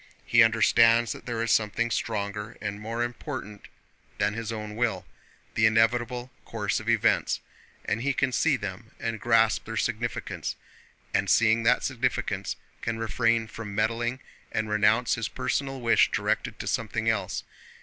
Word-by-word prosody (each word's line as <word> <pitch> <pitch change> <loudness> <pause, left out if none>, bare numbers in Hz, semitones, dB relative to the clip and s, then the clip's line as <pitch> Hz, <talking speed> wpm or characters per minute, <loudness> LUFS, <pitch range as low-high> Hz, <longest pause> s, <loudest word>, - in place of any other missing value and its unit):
He 120 - +5
understands 115 +1 +5
that - - -8
there 115 -1 -1
is 115 - 0
something 110 +2 +1
stronger 105 0 -3
and 105 0 -4
more 115 +2 -2
important 120 -4 -6 0.5
than 105 0 +1
his 115 0 -4
own 105 -1 -5
will—the 110 -1 -4
inevitable 120 +3 +1
course - - -2
of - - -5
events, - - +2 0.5
and 110 +2 -1
he 140 +3 +1
can 130 0 0
see 120 - +2
them - - -6
and 115 -1 -3
grasp 115 -2 +3
their - - -5
significance, - - -2 0.6
and - - +1
seeing 115 0 +4
that 120 +2 +3
significance 125 -1 -1 0.3
can 115 -1 -2
refrain 115 0 +1
from 105 -2 -8
meddling 115 +4 0 0.3
and 110 0 -1
renounce 110 +3 +3
his 115 - -1
personal 135 -1 -2
wish 115 -2 +4
directed - - -1
to - - -6
something 110 0 -2
else. 100 -5 0
115 Hz, 150 wpm, -27 LUFS, 110-120 Hz, 0.6 s, He